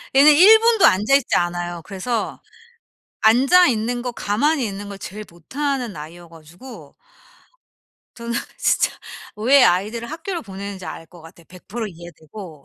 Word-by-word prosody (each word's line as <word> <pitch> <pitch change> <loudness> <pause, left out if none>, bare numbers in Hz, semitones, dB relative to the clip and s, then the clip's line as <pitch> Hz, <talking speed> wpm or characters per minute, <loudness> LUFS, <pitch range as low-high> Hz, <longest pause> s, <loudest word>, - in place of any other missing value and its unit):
얘는 285 +3 +7
1 400 +9 +7
분도 455 -3 +3
앉아 210 +8 +3
있지 280 - +1
않아요. 175 0 -2
그래서 215 +4 -4 0.8
앉아 270 +11 +5
있는 240 +1 -2
거 245 -1 -4
가만히 250 +6 0
있는 200 0 -7
걸 200 - -9
제일 210 +2 -8
못하는 250 - -4
아이여 165 +3 -11
가지고 165 +10 -14 1.2
더는 235 0 -6 0.3
진짜 - - +1 0.5
왜 255 +6 +4
아이들을 215 +8 0
학교로 340 +2 -5
보내는지 195 -2 -8
알 165 - -8
것 175 -2 -17
같아. 165 +1 -16
100% 190 +6 -8
이해되고. 170 -2 -12
215 Hz, 285 characters per minute, -20 LUFS, 175-265 Hz, 1.2 s, 얘는